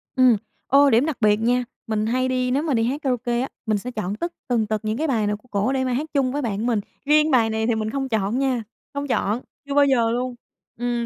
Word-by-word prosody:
Ừm, 255 -3 +6 0.3
ô, 280 +1 +6
điểm 240 +4 +4
đặc 315 -4 -2
biệt 210 -1 +5
nha, 245 +2 +2 0.2
mình 215 -1 0
hay 255 +3 +1
đi 255 -1 0
nếu 280 +4 +1
mà 300 -5 0
đi 225 - +2
hát 265 +6 -1
karaoke 245 -3 0
á, 265 - -1 0.2
mình 215 -1 +1
sẽ 245 +5 -6
chọn 205 -4 -3
tất 340 +9 -4
tần 235 -3 +1
tật 215 +1 -2
những 215 +2 -1
cái 320 - 0
bài 225 -7 +1
nào 210 0 -1
của 255 - -26
cổ 205 +6 +1
để 265 -1 0
mà 255 -1 0
hát 280 +6 -1
chung 270 -3 +2
với 290 +2 -2
bạn 220 -3 -2
mình, 235 -4 +2 0.3
riêng 305 +1 +4
bài 235 -4 +4
này 220 0 -1
thì 235 - +2
mình 220 0 -2
không 270 +2 -3
chọn 220 +1 0
nha, 260 -4 0 0.3
không 285 0 -3
chọn, 235 -2 0 0.3
chưa 280 - -3
bao 285 0 +5
giờ 235 -5 +3
luôn, 250 +1 -2 0.4
ừm, 240 -1 -1
245 Hz, 265 wpm, -23 LUFS, 220-270 Hz, 0.4 s, Ừm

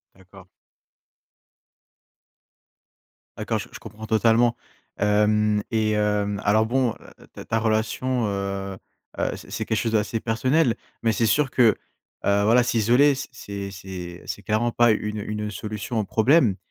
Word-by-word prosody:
D'accord. 95 0 -17 2.9
D'accord, - - -2
je - - -8
je - - -10
comprends 110 +1 -10
totalement. 115 +2 +3 0.4
Hem 105 0 +2
et 110 -1 +1
hem, 105 -1 0
alors, 110 +2 +3
bon, 125 -1 +1 0.4
ta - - -10
ta 115 - 0
relation, 115 +3 0
heu 100 -1 -3 0.4
heu, - - -1
c'est - - -13
c'est - - -3
quelque 110 - -1
chose 115 +2 -1
d'assez 110 +1 0
personnel, 125 +4 +1 0.3
mais 115 - +3
c'est 115 - +1
sûr 135 +5 +2
que, 125 - +1 0.6
heu, 100 0 +3
voilà 120 +3 +5
s'isoler, 125 +5 +3 0.2
c'est 100 -4 -7
c'est 90 -2 -8
c'est - - -5
clairement 115 +3 0
pas 120 -1 +4
une 105 0 -2
une 105 0 -4
solution 105 +3 -4
au - - +1
problème 115 - +3
110 Hz, 140 wpm, -24 LUFS, 105-115 Hz, 2.9 s, voilà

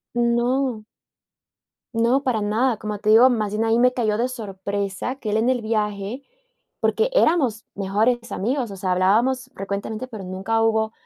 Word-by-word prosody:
No. 240 0 +1 1.1
No, 235 +4 +2
para 245 -5 0
nada, 220 +4 +1
como 210 0 -5
te 215 - +1
digo, 235 +4 +8
más 215 -4 -1
bien, 215 +2 -1
ahí 225 0 +2
me 250 0 +4
cayó 215 -4 0
de 245 +3 0
sorpresa 200 0 -4
que 220 -6 -5
él 215 - +1
en 230 +3 +2
el 255 -2 +1
viaje 215 +2 -2 0.6
porque 470 +3 +1
éramos 300 - +2
mejores 215 +5 0
amigos, 245 +2 -1
o 195 - -7
sea, 185 -1 -1
hablábamos 240 +8 +2
frecuentemente, 200 +4 -4
pero 220 -5 -8
nunca 195 +5 -1
hubo 220 0 +1
225 Hz, 165 wpm, -22 LUFS, 205-250 Hz, 1.1 s, digo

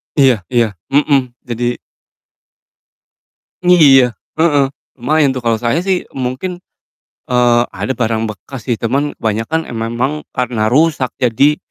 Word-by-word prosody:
Iya 130 - +3
iya. 120 -2 +2 0.2
Mhm, 140 -3 +2
jadi 120 0 -2 1.9
Iya, 135 -9 +6 0.2
heeh. 145 -4 +3 0.3
Lumayan 140 +2 +2
tuh 130 - -4
kalo 115 -1 +1
saya 120 +9 0
sih 190 -1 -1
mungkin, 130 +8 -3 0.7
eee, 120 -1 +3
ada 130 - -3
barang 115 -2 -1
bekas 110 +3 -9
sih 120 -3 -1
teman 140 +5 0
kebanyakan 115 +9 -1
emang 120 +6 -2
karena 125 -4 -1
rusak 145 -1 +2
jadi 135 +5 +3
125 Hz, 120 wpm, -16 LUFS, 120-145 Hz, 1.9 s, Iya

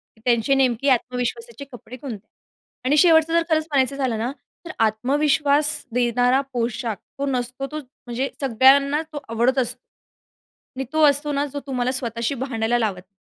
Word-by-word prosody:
की 220 - -25
त्यांचे 240 +2 +2
नेमके 265 0 +2
आत्मविश्वासाचे 250 - -2
कपडे 245 0 -11
कोणते 255 -3 -6
आहेत? 210 +1 -17 0.6
आणि 290 +3 +3
शेवटचं 325 -1 +5
जर 335 - +4
खरंच 315 -1 +2
म्हणायचं 270 -1 +2
झालं 260 -5 -1
ना, 235 +4 -2 0.3
तर 355 - -6
आत्मविश्वास 285 +6 +2 0.2
देणारा 245 +2 +2
पोशाख 235 -2 -2 0.2
तो 280 - 0
नसतो, 255 0 -3
तो 305 +2 -5
म्हणजे 260 -1 -5
सगळ्यांना 275 +3 +4
तो 290 - -4
आवडत 240 +4 +1
असतो. 250 -1 -1 1.0
आणि 270 - -2
तो 315 0 +2
असतो 290 +1 +1
ना, 285 0 0
जो 285 0 -6
तुम्हाला 255 -2 -1
स्वतःशी 235 0 -2
भांडायला 240 -2 -1
लावत 215 -4 0
नाही. 185 +2 -16
260 Hz, 160 wpm, -22 LUFS, 240-280 Hz, 1.0 s, शेवटचं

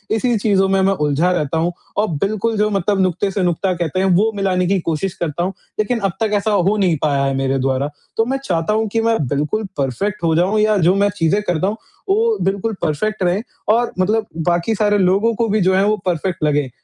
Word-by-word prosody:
इसी 240 +2 +1
चीज़ों 200 -2 +2
में 195 0 +2
मैं 195 +1 +3
उलझा 150 +2 +1
रहता 160 -3 -1
हूँ 170 +2 0 0.2
और 210 +1 +2 0.2
बिल्कुल, 215 +2 -1
जो 210 +1 +2
मतलब 200 0 0
नुक़्ते 185 +2 0
से 190 -1 -1
नुक़्ता 180 +2 0
कहते 175 0 -2
हैं, 190 - +1
वो 195 +4 +3
मिलाने 190 -2 0
की 195 +1 +1
कोशिश 170 +2 -2
करता 170 0 -3
हूँ। 190 - -2 0.3
लेकिन 225 +3 0
अब 195 -3 -1
तक 220 -1 +1
ऐसा 210 +1 +1
हो 200 +1 +2
नहीं 180 -5 +2
पाया 140 -2 +1
है 135 - 0
मेरे 135 0 0
द्वारा, 135 +2 0 0.3
तो 225 - +3
मैं 270 +3 -1
चाहता 170 +2 0
हूँ 220 0 0
कि 225 - +1
मैं 225 0 +2
बिल्कुल 150 - -1
परफ़ेक्ट 145 - -2
हो 165 -1 +2
जाऊँ, 185 +6 +2
या 215 0 +3
जो 180 +1 +3
मैं 200 +1 +2
चीज़ें 165 +4 +2
करता 175 +1 0
हूँ, 210 +2 -2 0.3
वो 440 +2 +2
बिल्कुल 200 +3 -1
परफ़ेक्ट 195 +7 -1
रहें 180 +3 +1 0.3
और 235 +2 +2
मतलब 215 +4 +1 0.2
बाकी 175 +5 +1
सारे 205 0 +2
लोगों 200 +4 +2
को 230 +1 0
भी, 215 - +1
जो 190 +1 +3
है, 190 - +3
वो 215 +1 +2
परफ़ेक्ट 175 -1 -2
लगे। 150 -2 +1
195 Hz, 230 wpm, -18 LUFS, 170-215 Hz, 0.3 s, मैं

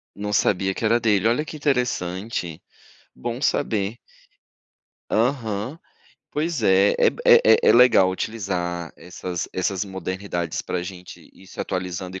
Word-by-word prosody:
Não 105 +1 -4
sabia 95 -1 +2
que - - -7
era 115 +2 +3
dele, 105 -2 +2
olha 120 +6 +1
que 155 - -8
interessante. 105 - -2 0.5
Bom 120 +1 -5
saber. 110 -7 0 1.1
Aham. 115 +2 -1 0.5
Pois 155 -3 -2
é, 95 +1 +4
é - - +5
b - - -10
é - - +8
é 110 0 +7
é - - +8
legal 120 -6 +6
utilizar 90 -4 -3
essas 90 +1 -6
essas 95 +1 -1
modernidades 95 -3 -4
pra 90 - -3
gente 90 0 -10
ir 95 - -18
se - - -9
atualizando 90 0 -4
e - - -7
100 Hz, 145 wpm, -23 LUFS, 90-115 Hz, 1.1 s, é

